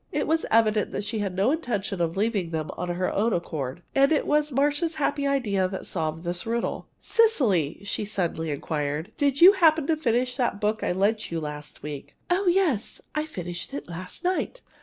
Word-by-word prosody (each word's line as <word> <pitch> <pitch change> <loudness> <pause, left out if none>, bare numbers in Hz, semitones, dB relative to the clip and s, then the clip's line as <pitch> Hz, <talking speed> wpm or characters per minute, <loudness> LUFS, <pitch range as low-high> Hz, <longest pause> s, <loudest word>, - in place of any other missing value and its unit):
It - - 0
was 320 0 +1
evident 215 -2 +3
that 205 - -2
she 220 +2 -3
had 195 -3 -2
no 200 +7 +3
intention 215 - -2
of 170 +1 -1
leaving 205 -4 0
them 160 -2 -3
of 180 - -5
her 180 +1 -1
own 220 +2 +1
accord. 155 -3 -3
And 275 +2 +4
it 305 - +2
was 300 0 +2
Marcia's 290 +5 +1
happy 285 -1 0
idea 210 -9 +1
that 190 +1 -6
solved 160 -1 -3
this 175 +4 -4
riddle. 235 +1 -2
"Cecily," 225 - +2
she 205 - -2
suddenly 175 -6 -2
inquired, 150 +4 -3
"do 285 - +3
you 285 +8 +8
happen 325 -6 +4
to 320 - +2
have 310 - -4
finished 250 -1 +1
that 240 -6 0
book 215 +1 0
I - - +1
lent 205 +4 +1
you 165 - -1
last 150 -1 -7
week?" 150 -2 -7 0.2
"Oh, 375 +2 +2
yes! 345 - +2
I 305 0 -1
finished 175 - -6
it - - -6
last 180 +2 -7
night. 370 +7 -1
215 Hz, 200 wpm, -26 LUFS, 175-285 Hz, 0.2 s, you